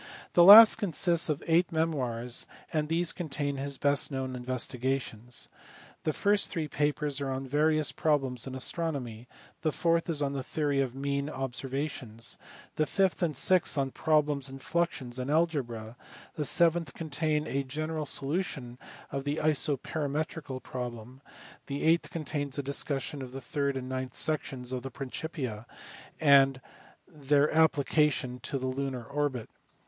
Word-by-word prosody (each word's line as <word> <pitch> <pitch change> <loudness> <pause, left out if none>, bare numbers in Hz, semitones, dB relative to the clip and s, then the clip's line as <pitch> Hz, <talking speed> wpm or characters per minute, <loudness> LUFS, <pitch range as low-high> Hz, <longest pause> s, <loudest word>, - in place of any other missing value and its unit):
The 175 - +7
last 215 +4 +11
consists 175 -4 +1
of 150 -1 -1
eight 170 +1 +3
memoirs 125 -7 -1 0.3
and 155 -1 0
these 165 +1 +1
contain 145 -4 -3
his 140 0 -4
best 140 -1 +1
known 130 -1 -3
investigations. 125 -1 -3 0.6
The 155 - +2
first 200 +6 +2
three 160 -4 -2
papers 145 -1 -1
are 140 - -2
on 135 0 -3
various 155 +3 +2
problems 135 -5 0
in 130 - -5
astronomy; 130 -5 -3 0.3
the 155 - +1
fourth 165 +2 +1
is 150 -3 0
on 140 0 -1
the 135 - -2
theory 145 +1 0
of 130 -2 -2
mean 140 +1 -2
observations; 135 -3 -4 0.4
the 155 - +2
fifth 190 +1 +1
and 160 -6 0
sixth 180 +2 +2
on 135 -1 0
problems 150 -3 +1
in 135 - -8
fluxions 135 -4 -2
and 125 +2 -3
algebra; 130 -9 0 0.4
the 150 - -2
seventh 165 -2 +2
contains 155 -1 -1
a 140 - 0
general 155 +3 -3
solution 135 -5 -2 0.3
of 135 0 -3
the 145 +1 -1
isoperimetrical 150 -1 -1
problem; 125 0 -7 0.5
the 140 0 -3
eighth 165 +1 +3
contains 145 -3 -3
a 145 - -1
discussion 140 +1 -2
of 130 -1 -8
the 135 - -5
third 140 0 -2
and 130 -1 -5
ninth 130 -1 -4
sections 135 -5 -2
of 130 -1 -2
the 135 - -6
Principia, 130 -3 -5 0.5
and 135 -3 +5 0.5
their 145 -3 +2
appli 160 -3 +4
cation 150 -5 +1
to 140 - -3
the 130 - -4
lunar 130 -1 -3
orbit. 140 -2 -2
140 Hz, 150 wpm, -29 LUFS, 130-155 Hz, 0.6 s, last